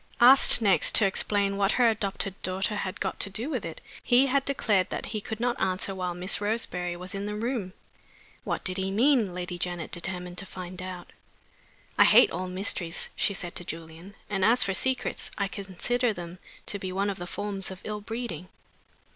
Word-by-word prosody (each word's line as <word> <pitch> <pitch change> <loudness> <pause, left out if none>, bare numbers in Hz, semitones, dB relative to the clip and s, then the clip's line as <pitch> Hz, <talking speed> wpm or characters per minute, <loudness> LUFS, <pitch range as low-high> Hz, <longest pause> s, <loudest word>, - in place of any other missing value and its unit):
Asked 250 -1 +8
next 195 -4 +4
to 215 - +7
explain 200 0 +1
what 200 0 +2
her 245 -2 +4
adopted 200 -3 -1
daughter 190 +3 -1
had 190 -2 -4
got 190 - -3
to 200 - 0
do 225 +9 -3
with 255 -7 -2
it, 165 -1 -7 0.2
he 250 +2 +5
had 275 +1 +2
declared 210 -9 +1
that - - -4
he 215 - -2
could 220 +1 -6
not 245 +1 -1
answer 190 +1 0
while 180 -2 -3
Miss 185 +3 0
Roseberry 185 -5 -1
was 180 +1 -8
in 200 +1 -4
the 210 - -3
room. 220 -4 -3 0.7
What - - -3
did 185 0 -1
he 190 0 -1
mean? 225 -2 +2
Lady 180 0 -4
Janet 175 -2 -4
determined 180 0 -5
to 195 - -5
find 185 0 -8
out. 185 -1 -7 0.9
"I - - +9
hate - - +7
all 185 +2 -3
mysteries," 180 -2 0
she 200 - +1
said 175 -2 -5
to - - -5
Julian. 165 +4 -9
"And 195 -2 -1
as 230 +5 +5
for 195 -1 0
secrets, 260 +5 -1
I 200 - 0
consider 215 +5 -1
them 175 -1 -8 0.3
to 205 - -3
be 185 -1 -4
one 200 +2 0
of 190 - -8
the 175 - -5
forms 195 0 -4
of 190 -1 -8
ill 210 -1 -4
breeding. 215 -6 -5
195 Hz, 195 wpm, -27 LUFS, 180-215 Hz, 0.9 s, I